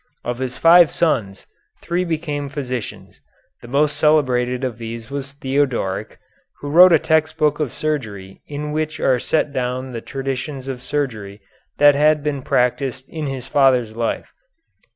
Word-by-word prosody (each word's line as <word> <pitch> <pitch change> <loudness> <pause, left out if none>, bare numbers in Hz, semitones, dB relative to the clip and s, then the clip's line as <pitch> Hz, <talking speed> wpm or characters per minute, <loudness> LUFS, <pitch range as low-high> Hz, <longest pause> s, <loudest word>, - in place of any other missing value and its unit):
Of 120 0 -4
his 130 -1 -4
five 170 -1 +7
sons, 115 - -1 0.3
three 175 +1 -1
became 155 -4 -3
physicians. 130 -5 -6 0.4
The - - -11
most 145 +4 +1
celebrated 125 -5 +2
of 120 -3 -3
these 115 +1 -7
was 140 0 -5
Theodoric, 130 -8 -2 0.4
who 145 - -6
wrote 180 +3 +8
a 165 - +7
text 160 0 +1
book 150 -1 +1
of 150 -6 -1
surgery 110 -11 -4
in 150 +1 -5
which 155 0 -2
are 130 -2 +2
set 150 +2 0
down 130 0 -3
the 115 -2 -5
traditions 135 +1 -5
of 130 -2 -5
surgery 115 -8 -4 0.4
that 145 0 +7
had 150 +1 +3
been 145 -2 -2
practised 130 +1 -1
in 155 -2 -4
his 135 -3 -5
father's 125 -5 +2
life. 115 -1 -3
135 Hz, 150 wpm, -20 LUFS, 125-150 Hz, 0.4 s, wrote